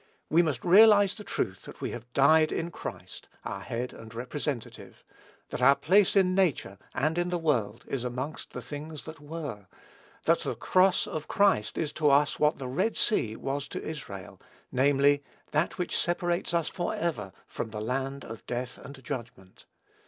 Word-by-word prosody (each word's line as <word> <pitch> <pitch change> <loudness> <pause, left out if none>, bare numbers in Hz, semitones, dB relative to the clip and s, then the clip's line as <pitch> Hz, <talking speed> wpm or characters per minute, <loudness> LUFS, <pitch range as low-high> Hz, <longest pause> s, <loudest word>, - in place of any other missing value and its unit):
We 165 +3 +6
must 150 -8 -2
realize 205 +1 +7
the 210 - -9
truth 95 - -3
that - - -11
we - - -3
have 120 0 -8
died 155 +3 +5
in 170 +1 -2
Christ, - - -8 0.2
our 100 - -4
Head 120 +5 -4
and 115 0 -11
Representative, 125 +2 -5 0.5
that - - -4
our 140 +2 +7
place 185 +9 +4
in 185 -2 +4
nature 150 - +1 0.2
and 155 +6 +1
in 175 0 0
the 180 - 0
world 120 -10 0
is 135 -3 -2
amongst 130 +5 -4
the - - -7
things 150 +1 -7
that 160 -1 -9
were, 145 - -6 0.6
that - - +4
the - - -3
cross 185 0 +3
of 155 -1 -5
Christ 190 - +2
is 155 -2 -1
to 150 0 +2
us 145 +1 +3
what 150 +1 +3
the 130 - -5
Red 140 - 0
Sea 110 - +1
was 135 +3 -3
to - - -6
Israel, 100 - -7 0.3
namely, 140 +2 +4 0.3
that 155 +3 0
which 180 -2 -2
separates 175 0 0
us 170 -2 +1
forever 165 - -2
from - - -5
the 105 0 -6
land 135 +5 -3
of 115 0 -9
death 125 0 -4
and 140 -1 -11
judgment. 120 -7 -8
145 Hz, 175 wpm, -28 LUFS, 125-170 Hz, 0.6 s, realize